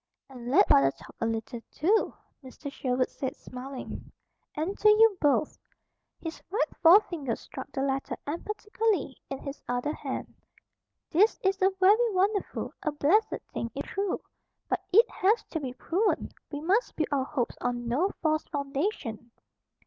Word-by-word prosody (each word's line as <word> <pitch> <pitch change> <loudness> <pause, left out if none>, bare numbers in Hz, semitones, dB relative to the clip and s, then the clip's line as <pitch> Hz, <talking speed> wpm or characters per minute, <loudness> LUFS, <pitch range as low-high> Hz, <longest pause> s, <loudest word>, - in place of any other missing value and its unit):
"And 245 -2 -7
let 270 - +5
father 135 0 +6
talk - - -12
a 225 - +2
little, 225 +1 -3
too," 400 +8 +1 0.3
Mr. 275 +2 -8
Sherwood 255 -2 0
said, 265 - -4
smiling, 255 +1 -8 0.4
"and 325 +7 -2
to 425 - +6
you 430 0 +6
both." 290 0 +2 0.6
His 325 -1 -6
right 415 +6 -1
forefinger 330 - +5
struck 265 +1 -9
the 270 - -2
letter 270 0 -1
emphatically 415 - -1
in 270 - -3
his 275 +1 -7
other 245 +5 0
hand. - - -5 0.8
"This 400 +7 +4
is 385 0 +1
a 380 - +6
very 430 +5 +5
wonderful, 400 +2 0
a 305 - 0
blessed, 335 +10 +2
thing, 230 - -3
if 280 - -3
true. 395 -1 -2 0.5
But - - 0
it 450 +6 +7
has 425 +4 +2
to 320 - -1
be 265 -4 -4
proven. 360 - 0 0.2
We 290 -1 -4
must 390 +9 +1
build 315 - -1
our 275 -2 +2
hopes 265 -4 -2
on 240 -1 -2
no 290 +12 +2
false 310 -1 +2
foundation." 275 - -3
305 Hz, 155 wpm, -28 LUFS, 265-395 Hz, 0.8 s, it